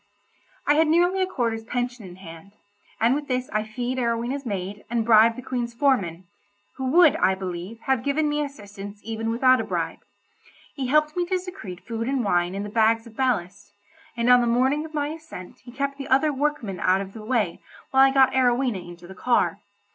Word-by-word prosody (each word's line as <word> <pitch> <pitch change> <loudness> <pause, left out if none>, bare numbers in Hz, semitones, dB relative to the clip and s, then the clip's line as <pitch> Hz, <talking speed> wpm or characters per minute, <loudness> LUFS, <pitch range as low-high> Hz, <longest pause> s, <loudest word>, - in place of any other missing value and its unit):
I 290 - +4
had 315 +1 +3
nearly 350 +4 +3
a 375 - +1
quarter's 230 -9 -2
pension 245 -1 -3
in 175 - -11
hand, 175 +1 -12 0.5
and 230 +3 +3
with 290 +1 -3
this 255 -1 -2
I 215 - +1
fee'd 245 +4 -4
Arowhena's 240 +3 -2
maid, 200 0 -4
and 230 -1 0
bribed 225 0 +6
the 255 - -8
Queen's 240 -2 -3
foreman—who 205 - -3
would, 320 +4 +5
I 190 - +3
believe, 190 +4 -6
have 265 -3 0
given 285 +4 0
me 295 0 0
assistance 205 -7 -9
even 225 0 -3
without 255 +2 +4
a - - -3
bribe. - - -3 0.7
He 265 -3 -3
helped 305 +3 +2
me 350 -1 -1
to 370 +1 +1
secrete 360 - -9
food 230 0 -4
and 265 -2 0
wine 175 -1 +1
in 200 - -3
the - - -5
bags 225 +1 +2
of 230 -2 -14
ballast, 205 -5 -2 0.4
and 235 0 0
on 250 0 +7
the 240 - 0
morning 265 +6 +2
of 315 -1 -10
my 290 -1 -1
ascent 310 - -10
he 245 - -13
kept 275 +2 -3
the 275 - -5
other 280 +3 +3
workmen 270 - -2
out 185 +1 +2
of 195 0 -8
the 220 - -9
way 215 -7 -1 0.3
while 265 - +5
I 270 - +7
got 265 -1 +4
Arowhena 250 -4 +2
into 175 0 -12
the 190 - -10
car. 235 -1 +1
240 Hz, 200 wpm, -24 LUFS, 205-275 Hz, 0.7 s, on